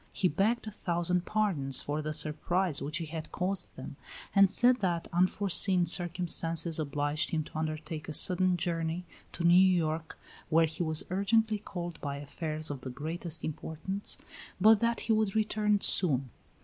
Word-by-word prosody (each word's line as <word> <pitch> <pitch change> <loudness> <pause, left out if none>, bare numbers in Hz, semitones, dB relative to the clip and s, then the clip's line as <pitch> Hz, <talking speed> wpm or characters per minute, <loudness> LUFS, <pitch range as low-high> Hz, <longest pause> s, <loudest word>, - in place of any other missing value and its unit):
He 185 - +1
begged 205 +10 0
a 215 - -6
thousand 175 -2 -1
pardons 175 -12 0
for 150 +1 -3
the 155 0 -3
surprise 155 +2 0
which 150 +3 -2
he 165 - -4
had 160 0 -7
caused 185 +2 -2
them, - - -9 0.4
and 195 -1 +6
said 245 +5 +3
that 175 -5 -1
unforeseen 185 0 +3
circumstances 170 -2 0
obliged 145 +2 -1
him 160 -2 -1
to 155 - -10
undertake 155 0 -4
a - - -4
sudden 180 +2 +3
journey 165 0 -2 0.3
to 170 - -4
New 170 0 +5
York, 165 -4 +2 0.3
where 165 0 +4
he 160 +2 -6
was 160 -2 0
urgently 215 +3 +1
called 175 -4 -7
by 140 -1 -3
affairs 155 +2 -4
of 140 -2 -6
the 130 - -6
greatest 160 +5 -4
importance, 160 +6 -2 0.4
but 215 +2 +6
that 235 +1 0
he 225 - +1
would 215 -2 0
return 210 -1 +1
soon. 135 - +2
170 Hz, 160 wpm, -30 LUFS, 155-190 Hz, 0.4 s, and